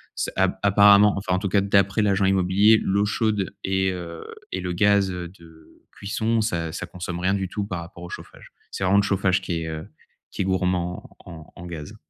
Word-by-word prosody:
ce - - -2
ap - - +1
apparemment, 100 0 +6
enfin, 95 -1 -2
en 90 - +1
tout 100 - -2
cas, 100 +2 +3
d'après 100 +1 +2
l'agent 100 -1 +2
immobilier, 95 +3 +4
l'eau 100 +2 +1
chaude 105 -2 -1
et 95 0 0
heu 85 -2 -8 0.3
et 95 - -3
le 90 -1 -3
gaz, 100 +1 +3
heu, 90 -1 -5
de 80 -3 -19
cuisson 110 +3 -1
ça 85 -7 -2
ça - - -5
consomme 90 -1 -6
rien 95 +2 +1
du 95 -1 -2
tout 100 +2 -3
par 90 -3 -5
rapport 85 0 -11
au 90 - -8
chauffage. - - -11 0.2
C'est - - -5
vraiment 95 +2 +3
le - - +2
chauffage 95 -2 +1
qui 85 -3 -3
est, 80 - -5
heu, 80 0 -6 0.4
qui - - -4
est - - -4
gourmand 90 -2 -1 0.2
en 80 -3 -11
en 90 - -10
gaz. 80 -4 -8
95 Hz, 215 wpm, -23 LUFS, 90-100 Hz, 0.4 s, apparemment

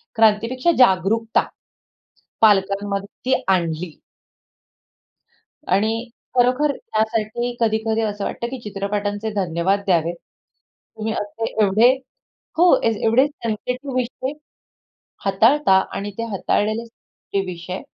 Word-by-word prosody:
क्रांतीपेक्षा 230 +7 +3
जागरूकता 225 0 +3 1.0
पालकांमध्ये 200 -1 +2 0.2
ती - - +3
आणली. 170 -2 -1 1.8
आणि 220 +5 +1 0.3
खरोखर 255 +4 +3
त्यासाठी 220 +2 -2
कधी-कधी 220 0 +1
असं 205 -2 -2
वाटतं 235 - -3
की 265 - -5
चित्रपटांचे 205 0 -3
धन्यवाद 185 0 0
द्यावेत. 170 -2 +2 0.8
तुम्ही 220 0 -2
असं 210 +2 -4 0.2
एवढे 215 +5 +5 0.7
हो, 350 +1 +6
ए - - +4 0.2
एवढे 230 +5 +5
सेन्सिटिव्ह 250 0 -4
विषय 255 +1 -2 0.9
हाताळता. 200 +2 +4 0.2
आणि 200 +1 -4
ते 230 - -1
हाताळलेलेच 215 +3 -1 0.5
जे 200 - +3
विषय 180 +1 -6
215 Hz, 95 wpm, -21 LUFS, 195-235 Hz, 1.8 s, हो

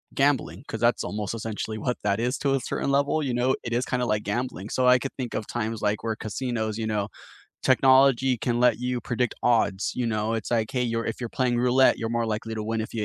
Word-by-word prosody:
gambling 140 -2 +1
'cause - - -5
that's - - +2
almost 105 +3 -3
essentially 110 -1 -4
what 125 +3 -2
that 100 0 +1
is, 125 +3 0
to 140 -1 +1
a - - +1
certain 135 - -3
level, 140 +2 +2
you 130 - -1
know? 125 +2 +2
It 120 - -4
is 125 +2 +1
kinda 125 -1 -1
like 105 -2 0
gambling. 105 -2 -3
So 130 -1 +1
I 125 0 +7
could 135 +2 -5
think 125 -3 -4
of 110 - -3
times, 115 -2 -3
like, 105 -1 0
where 110 -1 -1
casinos, 110 0 -3
you 110 -1 -2
know 105 -1 -1 0.6
technology 130 -1 +5
can 120 +1 -1
let 125 0 +3
you 125 0 -1
predict 120 -1 -1
odds, 110 -5 +2
you 125 - -1
know, 110 -1 0
it's, 115 - -4
like, 115 -2 +1
"Hey, 125 - 0
you're 115 -1 -1
if 115 - -4
you're 120 - -3
playing 125 -1 0
roulette, 125 +2 +4
you're 115 - -3
more 115 0 0
likely 110 +1 -3
to 110 - -3
win 110 +1 -2
if 110 - -5
you 110 -2 -2
120 Hz, 245 wpm, -26 LUFS, 110-125 Hz, 0.6 s, I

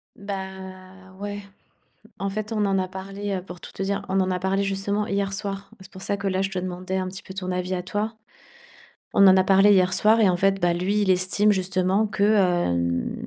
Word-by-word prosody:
Bah 190 -1 -8
ouais. 205 0 -5 0.8
En 195 0 -1
fait 215 +2 -4
on 210 -2 0
en 195 -1 +1
a 185 - 0
parlé, 195 +2 -5
heu, 185 - -3
pour 180 -1 -11
tout - - -10
te - - -5
dire, 200 +1 -2
on 190 +1 +1
en 185 0 0
a 180 - 0
parlé 190 +2 0
justement 200 +1 -1
hier 200 0 -1
soir. 195 -1 -5
C'est 190 +1 -14
pour 190 -1 -11
ça 200 - -1
que 200 0 -3
là, 190 0 -1
je 195 - -1
te 190 - -3
demandais 185 +1 -4
un 185 0 -2
petit 190 +1 -8
peu 190 - -10
ton 185 -1 -4
avis 180 +1 -2
à 180 - -3
toi. 205 +5 -3 1.0
On 200 - +7
en 190 0 +7
a 190 - +5
parlé 195 +2 +5
hier 185 -2 +3
soir 220 +4 +4
et 210 - +5
en 180 - +2
fait, 195 +2 +1
bah 175 0 +2
lui, 190 +4 0
il 195 - +1
estime 185 +3 +3
justement 190 +2 +1
que, 205 -1 -3
hem, 175 - +2
190 Hz, 230 wpm, -24 LUFS, 185-200 Hz, 1.0 s, On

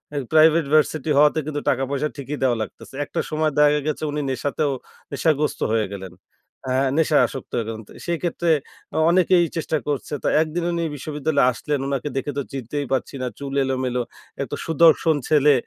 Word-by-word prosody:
ওই 140 - 0
private 160 0 +5
varsity 155 0 +2
হওয়াতে 150 +2 +5
কিন্তু 145 -1 -3
টাকা-পয়সা 135 +3 0
ঠিকই 140 +1 -5
দেয়া 125 -3 +3
লাগতেসে। 120 - -8
একটা - - -4
সময় 155 0 0
দেখা 150 0 +5
গেছে 155 0 -2
উনি 150 0 -2
নেশাতেও 140 +3 -1 0.4
নেশাগ্রস্ত 150 +1 +1
হয়ে 110 -2 +2
গেলেন। 95 -2 -7 0.5
হ্যাঁ, 130 +1 +2
নেশায় 155 -2 +4
আসক্ত 135 - -9
হয়ে 115 - -1
গেলেন। 110 -1 -6
তো - - -17
সেইক্ষেত্রে 170 0 0 0.4
অ - - 0
অনেকেই 180 0 +4
চেষ্টা 160 0 0
করছে। 145 +1 -2
তো - - 0
একদিন 165 +2 -2
উনি 170 0 -1
বিশ্ববিদ্যালয়ে 145 -1 0
আসলেন। 145 +3 -2
উনাকে 140 +1 -2
দেখে 145 +2 -2
তো - - +1
চিনতেই 140 +2 -4
পারছি 135 +2 -2
না। 125 - -1
চুল 140 -1 -5
এলোমেলো। 130 -2 -1 0.4
একটা - - -3
সুদর্শন 160 0 +4
ছেলে 150 -1 +5
145 Hz, 170 wpm, -22 LUFS, 135-155 Hz, 0.5 s, private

